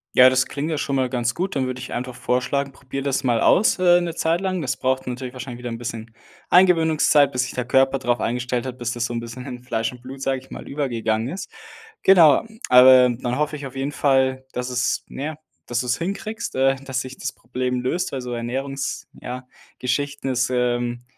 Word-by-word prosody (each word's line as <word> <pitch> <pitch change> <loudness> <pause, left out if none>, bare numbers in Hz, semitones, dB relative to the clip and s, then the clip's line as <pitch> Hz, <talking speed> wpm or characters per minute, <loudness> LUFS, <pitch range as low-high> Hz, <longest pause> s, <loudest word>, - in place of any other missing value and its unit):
Ja, 130 0 +9
das 130 0 +2
klingt 145 +2 -4
ja - - 0
schon 140 -1 -1
mal 130 -1 +1
ganz 120 -1 -1
gut, 185 +2 -2
dann 135 -2 0
würde 130 0 -4
ich 125 - -7
einfach 125 0 -4
vorschlagen, 130 +2 -1
probier 135 +1 -6
das 135 0 -1
mal 120 -3 +2
aus, 210 - +4
äh, 175 -1 +5
'ne 175 -1 -2
Zeit 165 +2 +1
lang. 185 -2 -1
Das 130 -3 -2
braucht 130 0 -1
dann 125 - -2
natürlich 125 0 -7
wahrscheinlich 125 -1 -7
wieder 125 - -5
'n 115 - -5
bisschen 115 -1 -6 0.3
Eingewöhnungszeit, 160 -5 +5
bis 125 -2 0
sich 125 - -6
der 125 - -2
Körper 135 +2 +3
drauf 120 -1 +1
eingestellt 120 +1 -2
hat, 130 -1 -5
bis 120 -2 -3
das 120 -1 -2
so 120 - -3
'n 115 - -2
bisschen 115 +2 -8
in 125 0 -7
Fleisch 115 -2 -2
und 125 -1 -13
Blut, 130 +2 -9
sage 135 -1 -1
ich 130 - -20
mal, - - -8
übergegangen 115 -5 -1
ist. 180 +7 -6 0.5
Genau, 170 -7 +6 0.2
aber 125 0 +8
dann 120 +1 -3
hoffe 150 0 0
ich 145 -2 -6
auf 130 - -15
jeden 135 +2 -2
Fall, 130 -2 +2
dass 125 0 -3
es, 120 -1 0
na 135 - -7
ja 155 0 -4 0.3
dass 120 0 -1
du 125 - -6
es 125 - +1
hinkriegst, 210 - -4
äh, 135 +1 +4
dass 130 -1 -2
sich 130 0 -9
das - - -4
Problem 125 +1 -3
löst, 140 +8 -1
also 125 -2 -4
Ernährungs 130 +3 -3
ja, 125 +1 -6 0.3
Geschichten. 140 +2 -2
Es, 130 0 0
ähm, 120 -1 -1
130 Hz, 225 wpm, -22 LUFS, 125-140 Hz, 0.5 s, Ja